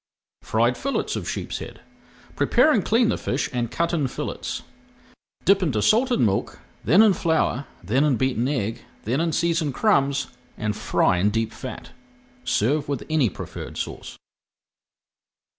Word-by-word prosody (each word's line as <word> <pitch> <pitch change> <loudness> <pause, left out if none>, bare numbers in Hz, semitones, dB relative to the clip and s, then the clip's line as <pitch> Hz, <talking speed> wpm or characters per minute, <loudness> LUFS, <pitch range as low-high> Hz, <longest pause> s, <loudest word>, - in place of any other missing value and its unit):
FRIED 120 +3 +1
FILLETS 275 +1 -1
OF - - -4
SHEEPSHEAD - - -5 0.6
Prepare 310 - +4
and 220 - +2
clean 230 +1 +3
the - - -1
fish 135 - -2
and 120 -2 -1
cut 170 +6 -1
in 150 -5 +1
fillets. - - -5 0.8
Dip 195 0 +5
into 140 -12 0
salted 245 +3 +3
milk, 100 -4 0 0.3
then 180 - +6
in 215 -3 +5
flour, 160 -5 0 0.2
then 120 +10 +2
in 150 -4 +3
beaten 130 -1 0
egg, 115 -5 -2 0.2
then 125 +8 0
in 165 0 0
seasoned 165 -4 0
crumbs, 140 -10 +2 0.3
and 105 -2 -2
fry 90 - +1
in 100 +3 +3
deep 110 +1 -1
fat. - - -8 0.5
Serve 140 +7 +1
with 140 -4 -2
any 150 -7 +3
preferred - - -8
sauce. - - -6
140 Hz, 145 wpm, -24 LUFS, 120-170 Hz, 0.8 s, then